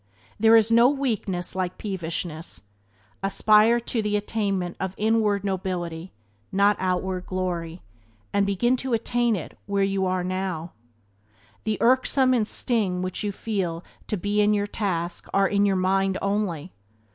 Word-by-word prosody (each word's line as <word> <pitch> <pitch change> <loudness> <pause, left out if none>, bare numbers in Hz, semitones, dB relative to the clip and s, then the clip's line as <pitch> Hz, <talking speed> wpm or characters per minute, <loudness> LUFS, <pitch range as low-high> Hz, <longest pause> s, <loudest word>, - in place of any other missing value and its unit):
There 225 +1 +6
is 225 0 +4
no 235 +2 +6
weakness 215 -11 -2
like 185 -1 -2
peevishness. 170 -4 -4 0.6
Aspire 215 +4 +4
to 230 0 -2
the 210 -1 -1
attainment 200 -4 -2
of 190 0 -3
inward 215 -2 +2
nobility, 180 -3 -3 0.4
not 200 +2 +4
outward 185 0 -1
glory, 180 -2 -3 0.5
and 200 - +3
begin 200 +6 +2
to 260 -1 -3
attain 235 0 +1
it 175 - -7
where 200 -1 +1
you 195 0 0 0.2
now 185 -2 -2
are. 165 +2 -9 0.9
The 215 -1 0
irksomeness 255 +1 +3
and 220 -3 +1
sting 205 -9 0
which 185 +2 -4
you 205 - -1
feel 190 -5 -3 0.2
to 210 - -1
be 205 +3 0
in 210 0 +3
your 205 0 0
task 180 -5 -3
are 195 0 +4
in 200 +1 +2
your 195 - +2
mind 190 +1 +1
only. 195 -5 -2
195 Hz, 145 wpm, -25 LUFS, 185-215 Hz, 0.9 s, There